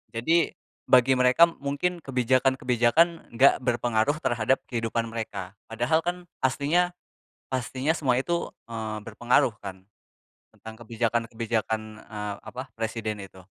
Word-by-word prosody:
Jadi 160 +8 +2 0.3
bagi 130 +1 +6
mereka 125 +7 +6
mungkin 165 +4 -2
kebijakan-kebijakan 130 +3 +2
enggak 135 +4 +5
berpengaruh 120 +2 +1
terhadap 120 0 +1
kehidupan 115 -1 -2
mereka 100 -4 -6
padahal 120 +7 +1
kan 175 0 -4 0.2
aslinya 170 +7 +1 0.5
pastinya 130 +4 -1
semua 130 -6 +1
itu, 170 +5 -1 0.2
eee, 110 -2 -4
berpengaruh 115 +1 +2
kan 95 -1 -8 0.7
tentang 110 0 -11
kebijakan-kebijakan, 115 -1 -1 0.2
eee, 105 -2 -5
apa, 130 +2 -7
presiden 110 -1 -3
itu. 95 -1 -15
120 Hz, 110 wpm, -26 LUFS, 115-140 Hz, 0.7 s, bagi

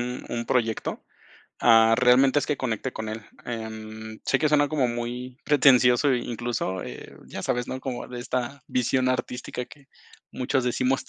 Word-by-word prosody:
un 125 +1 -4
un 115 0 -3
proyecto, 115 -3 -1 0.6
ah, 115 -1 +6
realmente, 130 +2 +5
es - - -2
que 150 - 0
conecte 125 0 -3
con 110 0 -5
él. 110 0 -5 0.2
Em, 110 -1 -7
sé - - +2
que 155 - +2
suena 145 -1 +3
como 140 -5 +1
muy 120 +2 -5
pretencioso, 135 -1 +5
incluso, 120 -5 -2
eh, - - -9
ya - - -7
sabes, 125 0 -1
¿no? 130 - -4
Como 125 -2 -5
de 125 - -7
esta 125 +2 -3
visión 130 +1 +1
artística 125 -1 -3
que 140 +2 -17 0.5
muchos 130 0 0
decimos 130 +2 0
125 Hz, 160 wpm, -25 LUFS, 115-130 Hz, 0.6 s, ah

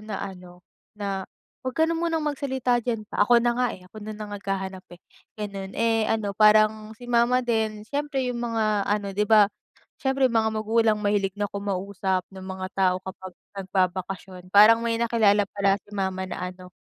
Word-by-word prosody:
na 215 -2 -5
ano, 180 -2 -9 0.4
na 195 -2 -3 0.4
"'Wag 255 - -3
ka - - +7
na 330 0 -1
munang 330 -2 0
magsalita 265 -4 0
diyan, 225 -2 -3
pa. 205 - +2
Ako 240 -1 +5
na 240 - +3
nga, 250 0 +2
eh, 185 - -14
ako 215 - -11
na 215 0 -6
na 210 -1 -7
nga 205 - -5
naghahanap, 190 -1 -4
eh," 175 - -13 0.3
gano'n. 200 -2 -6
Eh, 225 -1 +2
ano, 220 -2 0
parang 215 0 +4
si 245 +2 -12
mama 240 +2 +3
din 220 -3 -1
siyempre 285 -1 -2
yung 240 - -4
mga 215 -4 0
ano, 205 -1 0
'di 205 +2 0
ba 210 -2 +6 0.5
siyempre 265 0 +2
yung 230 - 0
mga 220 0 +2
magulang, 220 0 +2
mahilig 205 -2 +1
na 205 -1 -3
kumausap 195 -1 -2
ng 190 -1 -10
mga 190 0 -5
tao 185 -1 +3
kapag 190 -1 -8 0.2
nagbabakasyon. 185 -1 -2
Parang 215 +3 +8
may 230 - +1
nakilala 220 -3 +3
pala 200 -1 +2
si - - -23
mama 190 -1 -2
na 180 0 -4
ano, 180 0 -13
210 Hz, 190 wpm, -25 LUFS, 195-230 Hz, 0.5 s, Parang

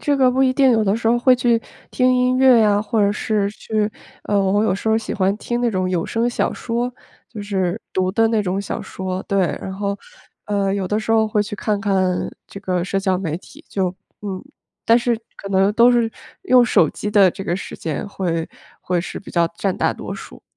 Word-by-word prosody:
这 290 -1 +1
个 260 -2 +4
不 265 +2 +2
一 260 - +3
定。 265 0 +4
有 220 - +3
的 200 +1 +2
时 230 -1 -4
候 240 +1 +4
会 255 +1 +5
去 240 -2 +2 0.3
听 255 0 +3
音 250 0 +2
乐 260 -2 +6
呀， 205 -1 +3
或 220 0 -1
者 200 0 +3
是 210 -1 0
去 215 0 -2 0.3
呃， 205 -1 +1
我 200 +2 +2
有 195 - +2
时 210 +3 -3
候 220 - +4
喜 225 - -5
欢 195 0 +1
听 240 +2 -3
那 240 -1 +1
种 185 -3 -1
有 175 -2 -1
声 230 +1 0
小 240 - -1
说 240 +1 -3 0.4
就 215 - -8
是 195 0 -1
读 185 0 +1
的 225 +3 +3
那 220 -2 +1
种 190 +1 -1
小 200 - -4
说。 185 0 -5
对， 195 -1 +2 0.2
然 190 - -6
后， 200 +1 -2 0.5
呃， 200 -1 0
有 195 -2 -2
的 210 - 0
时 220 +1 -1
候 220 -1 +4
会 210 -1 +1
去 210 - -6
看 205 0 -1
看 190 -3 +1 0.3
这 - - -10
个 180 -2 -1
社 195 +1 -1
交 190 -1 +1
媒 160 -5 -3
体。 180 - -15
就 185 -2 -1 0.3
嗯， 195 -3 -5 0.4
但 230 +1 +5
是 240 -1 0 0.2
可 195 - -8
能 195 +1 +3
都 235 +2 +6
是 235 -2 +2 0.3
用 255 -9 +5
手 - - +4
机 210 - -5
的 200 -3 +5
这 195 - -8
个 175 - -1
时 190 - -6
间 160 +4 -4
会 170 -4 -2 0.3
会 180 -1 -1
是 - - -6
比 - - -12
较 170 -1 +2
占 180 +3 -3
大 - - +1
多 - - -7
数。 - - -11
205 Hz, 245 characters per minute, -20 LUFS, 190-230 Hz, 0.5 s, 乐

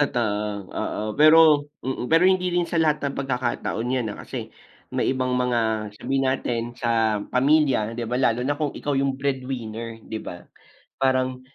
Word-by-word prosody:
at, 145 - +1
ah, 105 -3 -1
oo 105 +3 -4
pero 155 -1 +6 0.2
mm, 130 -1 -3
pero 165 +2 +5
hindi 185 -1 +3
rin 175 0 +1
sa 170 -1 0
lahat 150 -2 +1
ng 140 - -2
pagkakataon 125 -2 -2
yan, 120 -4 -1
ah, - - -8
kasi - - -6 0.5
may - - +1
ibang 130 -1 -1
mga 115 -4 0
sabihin 135 +1 0
natin 125 -3 -1
sa 115 -3 +1
pamilya 130 -5 +2
'di 120 -1 -4
ba, 125 - -1
lalo 120 -2 +2
na 145 +2 0
kung 150 -2 -1
ikaw 145 -1 -2
yung 135 0 +1
breadwinner 120 -5 -4
'di 110 - -6
ba, 90 0 -9 0.6
parang 130 -1 +1
130 Hz, 170 wpm, -24 LUFS, 115-140 Hz, 0.6 s, pero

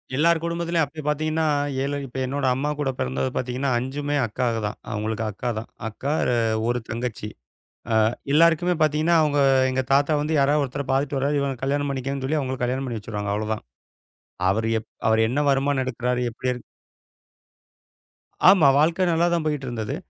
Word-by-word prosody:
எல்லாரு 165 +3 +4
குடும்பத்துலயு 170 0 0
அப்டி 155 +2 -6
பாத்தீங்கன்னா? 155 +2 0 0.4
7 145 +1 -2
இப்ப 130 0 -9
என்னோட 140 +1 -2
அம்மா 145 +3 -1
கூடப் 135 -3 -1
பிறந்தது 65 0 -1
பாத்தீங்கன்னா 130 +2 -1
5மே 145 +4 -2
அக்காக 115 +1 -1
தான். 105 - -4
அவங்களுக்கு 110 +1 -2
அக்கா 120 +5 -4
தான். 110 - -5 0.2
அக்கா, 130 +6 -4 0.2
அ - - +2 0.3
1 120 +1 +1
தங்கச்சி. 115 -2 -4 0.6
அ - - +3 0.4
எல்லாருக்குமே 170 +3 +4
பாத்தீங்கன்னா 155 +3 +3
அவங்க 145 -1 +1 0.3
எங்க 130 0 -1
தாத்தா 140 +3 +3
வந்து 155 +1 -1
யார 145 +2 +3
ஒருத்தர 140 +1 -3
பாத்துட்டு 135 +1 0
வறார். 145 +2 +1
இவன 135 -2 -2
கல்யாணம் 145 +1 0
பண்ணிக்க 135 +1 -3
சொல்லி 150 +2 0
அவங்களுக்கு 130 -2 -2
கல்யாணம் 130 +2 -2
பண்ணி 115 -2 -3
வச்சிருவாங்க. 105 -2 -4
அவ்ளோதான், 110 0 -3 0.9
அவரு 110 +3 0
எப் 110 - -16 0.2
அவரு 110 0 +3
என்ன 130 +5 0
வருமான 135 0 +1
எடுக்குறாரு 125 0 -1
எப்டி 125 +2 -2
எடுக் 125 - -9 1.9
ஆமா. 185 -7 +6
வாழ்க்க 170 +5 +2
நல்லா 170 +1 +2
தான் 165 -2 0
போய்டுருந்தது. 125 -8 -3
135 Hz, 160 wpm, -24 LUFS, 120-150 Hz, 1.9 s, ஆமா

